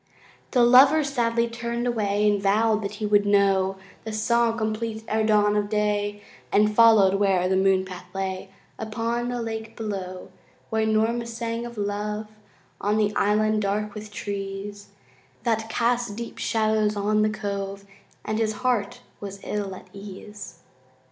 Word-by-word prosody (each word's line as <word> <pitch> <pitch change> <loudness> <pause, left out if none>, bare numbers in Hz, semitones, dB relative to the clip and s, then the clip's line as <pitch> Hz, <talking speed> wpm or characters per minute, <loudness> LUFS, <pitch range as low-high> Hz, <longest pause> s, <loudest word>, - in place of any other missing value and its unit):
The 250 -2 +3
lover 270 +6 +7
sadly 235 -4 0
turned 235 +1 -3
away 210 -3 +1
And 205 -1 +2
vowed 215 +2 +2
that 200 0 -4
he 215 0 -3
would 205 -1 +4
know 195 -2 +3 0.3
The 220 - -5
song 230 +1 +1
complete 220 0 -3
e'er 220 0 +1
dawn 210 -1 +3
of 205 -1 0
day 205 -1 -1 0.3
And 210 +1 +3
followed 220 -4 +6
where 190 -3 +2
the 190 - +1
moonpath 190 -1 +1
lay 190 0 -3 0.3
Upon 230 +2 -2
the 245 0 -2
lake 225 -1 -5
below, 190 -4 -5 0.4
Where 220 0 +1
Norma 225 +2 +1
sang 230 0 -4
of 235 -1 -11
love 210 +1 -3 0.5
On 205 +2 +1
the 210 -1 +1
island 215 +1 +2
dark 205 +1 -1
with 215 0 -8
trees 200 0 -5 0.6
That 225 -2 0
cast 240 -2 0
deep 235 +1 -7
shadows 215 -1 +1
on 210 +1 +1
the 215 - +3
cove, 200 -2 -4 0.4
And 215 +1 -1
his 220 -1 +1
heart 220 -6 0 0.2
was 200 -1 -7
ill 200 -2 -3
at - - -12
ease. 200 -3 -10
210 Hz, 150 wpm, -25 LUFS, 200-225 Hz, 0.6 s, lover